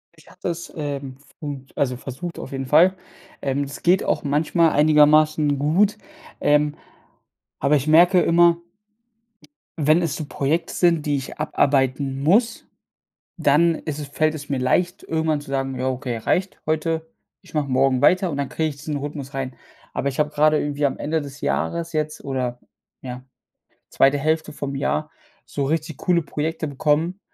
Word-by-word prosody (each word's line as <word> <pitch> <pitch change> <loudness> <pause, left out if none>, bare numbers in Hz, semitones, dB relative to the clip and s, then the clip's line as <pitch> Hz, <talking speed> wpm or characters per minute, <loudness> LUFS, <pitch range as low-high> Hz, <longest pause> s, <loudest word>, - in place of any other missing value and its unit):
Ich - - -21
habe - - -19
das, 170 -1 -4
ähm, 140 -3 -4
f 145 - -25
und 140 -3 -7
also, 125 -3 0
versucht 135 +7 -7
auf - - -7
jeden 135 -1 -4
Fall. 170 +7 +5 0.5
Ähm, 140 0 -1
es 140 0 -8
geht 180 +2 +3
auch - - 0
manchmal 155 +3 +2
einigermaßen 150 0 +4
gut, 185 +9 +2 0.4
ähm, 150 0 +2 0.8
aber 145 +2 +3
ich 140 0 -1
merke 175 +4 +6
immer 170 0 +4 1.2
wenn 155 +3 +4
es 160 - -1
so 155 - -5
Projekte 155 +4 -1
sind, 170 -4 +2
die 145 - +1
ich 135 +2 -7
abarbeiten 135 -2 +1
muss, 220 - +2 0.7
dann 165 +2 +4
ist 155 -2 -5
es 150 - -5
fällt 155 +2 0
es 145 -1 -8
mir 135 - 0
leicht, 180 +9 0
irgendwann 160 -2 -1
zu 145 - -11
sagen: 135 -1 -2
„Ja, 130 +1 0
okay, 125 -2 -3
reicht 185 - -1
heute, 160 +1 -1 0.3
ich - - -19
mache 150 -2 0
morgen 130 0 +2
weiter“, 185 -1 +4
und 140 - -4
dann 140 -2 -3
kriege 160 -1 -1
ich 145 - -7
diesen 150 0 -4
Rhythmus 140 -1 -6
rein. 135 -2 -4 0.4
Aber 140 - -1
ich 135 - -5
habe 150 - +2
gerade 155 0 +3
irgendwie 145 0 -2
am 135 - -3
Ende 155 +1 -1
des 140 0 -10
Jahres 80 - -2
jetzt 155 0 -2
oder, 125 -3 -3 0.4
ja, 125 0 -8 0.7
2. 135 +1 +3
Hälfte 155 +2 0
vom 140 -1 -5
Jahr, 150 +2 -1 0.3
so 140 - -3
richtig 160 +1 -2
coole 175 -2 +1
Projekte 155 +2 -3
bekommen, 150 +6 0
150 Hz, 170 wpm, -22 LUFS, 140-160 Hz, 1.2 s, merke